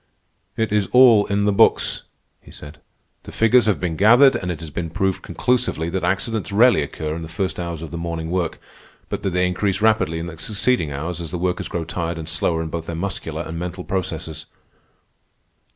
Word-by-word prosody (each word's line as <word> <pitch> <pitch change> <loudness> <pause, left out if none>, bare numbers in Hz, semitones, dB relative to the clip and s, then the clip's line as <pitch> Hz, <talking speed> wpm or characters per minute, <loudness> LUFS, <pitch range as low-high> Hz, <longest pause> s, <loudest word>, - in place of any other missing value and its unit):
"It 110 -1 0
is 105 -2 +1
all 120 -5 +7
in 100 0 0
the 105 - +3
books," 100 - +3 0.4
he - - -17
said. 75 +1 -12 0.4
"The - - -11
figures 115 0 +4
have 105 - +2
been 85 -3 -2
gathered, 120 - +6
and 95 -6 -3
it 85 - -3
has 80 -2 -8
been 85 +2 -4
proved 95 +2 -1
conclusively 120 -10 -1
that 95 0 -2
accidents 100 +4 -1
rarely 115 -3 +5
occur 75 +2 -4
in 85 - -6
the 80 - -6
first 90 +4 -3
hours 85 -2 -4
of 80 - -8
the 85 - -5
morning 85 -1 -4
work, 90 -3 -1 0.5
but - - -3
that - - -1
they 90 0 +1
increase 95 +2 0
rapidly 110 -7 +2
in 80 - -4
the 85 -2 -8
succeeding 100 -1 0
hours 80 +5 -4
as 85 - -6
the 90 - -4
workers 90 +1 -2
grow 85 - -3
tired 85 0 -3
and 80 -1 -6
slower 85 -1 0
in 80 - -5
both 80 0 -5
their 85 - -4
muscular 85 -3 -4
and 80 0 -6
mental 90 +1 -5
processes. 80 -5 -4
90 Hz, 205 wpm, -21 LUFS, 80-100 Hz, 0.5 s, all